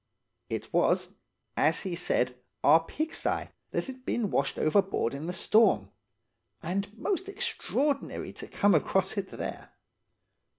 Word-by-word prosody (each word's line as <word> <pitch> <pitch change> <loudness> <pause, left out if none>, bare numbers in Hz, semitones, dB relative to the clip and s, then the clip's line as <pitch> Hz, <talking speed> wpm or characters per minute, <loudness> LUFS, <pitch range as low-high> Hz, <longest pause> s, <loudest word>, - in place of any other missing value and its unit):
"It - - -4
was, - - +2 0.4
as 155 +3 +3
he 190 - -4
had 170 - -3
said, 125 -7 +1 0.3
our 160 +3 +7
pigsty 310 - -2 0.2
that - - -1
had 260 -1 -9
been 235 -5 -1
washed 140 0 0
overboard 190 - +2
in 145 +4 -5
the - - -1
storm; 215 +5 +3 0.7
and 195 +4 -2
most 380 - -1
extraordinary 390 - -1
to - - -9
come 205 -1 +3
across 190 +5 +2
it 200 -2 -2
there. - - -6
195 Hz, 135 wpm, -29 LUFS, 165-260 Hz, 0.7 s, our